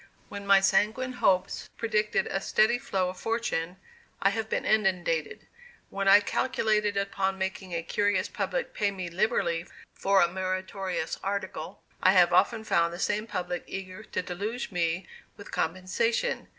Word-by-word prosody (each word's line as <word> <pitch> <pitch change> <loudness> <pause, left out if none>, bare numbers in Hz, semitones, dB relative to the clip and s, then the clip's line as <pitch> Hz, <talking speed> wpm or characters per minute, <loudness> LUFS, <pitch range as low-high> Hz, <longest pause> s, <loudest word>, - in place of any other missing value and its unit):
When 200 0 -7
my 195 -1 +7
sanguine 220 +6 +2
hopes 185 -7 +1
predicted 215 -2 +1
a 195 - -2
steady 220 +4 +3
flow 195 -9 -1
of 185 - -8
fortune, 190 -7 -2 0.4
I 195 - +3
have 220 +1 -3
been - - -1
inundated; 180 -7 0 0.5
when 195 0 -2
I 200 +1 +8
calculated 210 -2 0
upon 195 -1 -1
making 190 -1 -4
a 165 - -2
curious 205 0 +1
public 195 -3 -3
pay 205 -1 +1
me 185 -3 -5
liberally 170 -2 0 0.3
for 195 0 +2
a 175 - +5
meritorious 185 -1 -3
article, 190 -5 -4 0.2
I 185 - +5
have 180 -2 +5
often 210 +5 +3
found 170 -5 +2
the 175 - -6
same 210 +3 0
public 180 -4 -3
eager 190 +1 -6
to 215 - -4
deluge 210 +8 -4
me 175 0 -1 0.3
with 200 - -11
compensation. 470 - -1
195 Hz, 150 wpm, -28 LUFS, 180-210 Hz, 0.5 s, I